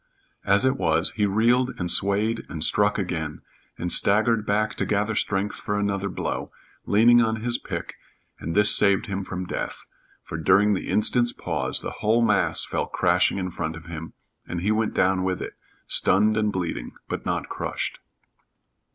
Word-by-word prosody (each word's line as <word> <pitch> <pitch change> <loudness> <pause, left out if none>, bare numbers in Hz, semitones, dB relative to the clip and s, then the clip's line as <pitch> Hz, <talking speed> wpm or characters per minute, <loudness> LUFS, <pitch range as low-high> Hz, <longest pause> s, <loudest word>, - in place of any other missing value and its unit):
As 100 +5 +3
it 130 - +1
was, 80 +3 +1
he 105 -2 0
reeled 120 +5 +2
and 90 -1 +1
swayed 100 +5 +3
and 80 -2 -4
struck 105 +4 +2
again, 80 -6 -4 0.4
and 90 0 -3
staggered 110 +1 +2
back 105 +1 0
to - - -1
gather 105 +1 0
strength 100 -1 -1
for 105 - -3
another 100 -1 -1
blow, 90 - -4 0.4
leaning 120 +3 +5
on 110 -1 -1
his 120 0 -1
pick, - - -6 0.5
and 80 +4 -5
this 105 +1 +7
saved 100 +1 +3
him 100 -2 -4
from 90 -1 -5
death; - - -5 0.4
for, - - -7
during 100 +6 +3
the 95 - -4
instant's 120 +3 +2
pause, - - -2
the - - -5
whole 115 +2 +2
mass - - +2
fell - - -3
crashing - - +1
in 90 -1 -3
front 80 -1 -4
of 80 0 -11
him, 80 -1 -8 0.3
and 90 -1 -4
he 105 +4 0
went 110 0 -1
down 95 0 +2
with 95 -1 -2
it, - - -6 0.3
stunned 105 +2 +3
and 105 -1 0
bleeding, 85 -11 -4
but - - -5
not - - -2
crushed. - - -4
100 Hz, 175 wpm, -24 LUFS, 90-110 Hz, 0.5 s, this